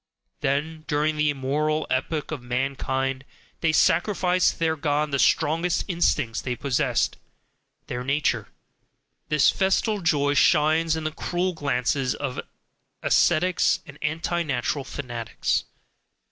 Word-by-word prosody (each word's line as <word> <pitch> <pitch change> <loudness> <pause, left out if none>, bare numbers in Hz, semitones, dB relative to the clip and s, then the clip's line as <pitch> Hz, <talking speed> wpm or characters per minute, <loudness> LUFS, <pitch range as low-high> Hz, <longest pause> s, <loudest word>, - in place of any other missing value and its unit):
Then, 155 +4 -1
during 150 +1 +1
the 150 -1 +2
moral 150 +3 0
epoch 145 +4 -1
of 150 -5 -4
mankind, 130 +1 -2 0.4
they 160 - +2
sacrificed 180 +2 +2
to - - -18
their 160 -1 +1
God 150 0 0
the 140 - 0
strongest 165 +6 +2
instincts 150 - 0
they 125 -1 -3
possessed, 130 -1 0 0.7
their 125 0 -4
"nature"; 140 +3 0 0.8
THIS 150 -1 +4
festal 200 +2 +1
joy 145 -4 +2
shines 155 +2 +3
in 160 - -4
the 155 - -2
cruel 180 +3 -2
glances 135 -3 0
of 135 -3 -4 0.6
ascetics 180 +3 +3
and 140 0 -13
"anti 165 +3 -1
natural" 140 -2 -1
fanatics. 120 -4 -3
150 Hz, 120 wpm, -25 LUFS, 135-160 Hz, 0.8 s, THIS